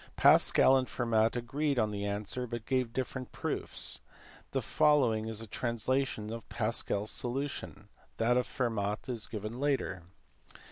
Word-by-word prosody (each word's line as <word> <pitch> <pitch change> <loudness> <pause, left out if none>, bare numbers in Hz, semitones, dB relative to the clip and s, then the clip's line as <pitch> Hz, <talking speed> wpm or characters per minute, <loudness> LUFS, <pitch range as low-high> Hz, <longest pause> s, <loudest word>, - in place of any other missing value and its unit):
Pascal 135 - +6
and 130 -1 -1
Fermat 115 -2 +1
agreed 140 +4 -1
on 110 -3 +2
the 100 -1 -3
answer, 105 +5 -3
but 120 -1 -5
gave 130 -2 0
different 130 0 -4
proofs. - - -1 0.5
The - - -1
following 125 -8 +3
is 110 -1 -2
a - - -6
translation 120 0 -1
of 115 -1 -8
Pascal 110 -3 -1
s 110 - -2
solution. 125 -5 -3 0.3
That 115 +2 +3
of 125 0 +1
Fermat 110 -4 -2
is 120 -4 -2
given 110 +2 -5
later. 135 -10 0
120 Hz, 145 wpm, -31 LUFS, 110-130 Hz, 0.5 s, Pascal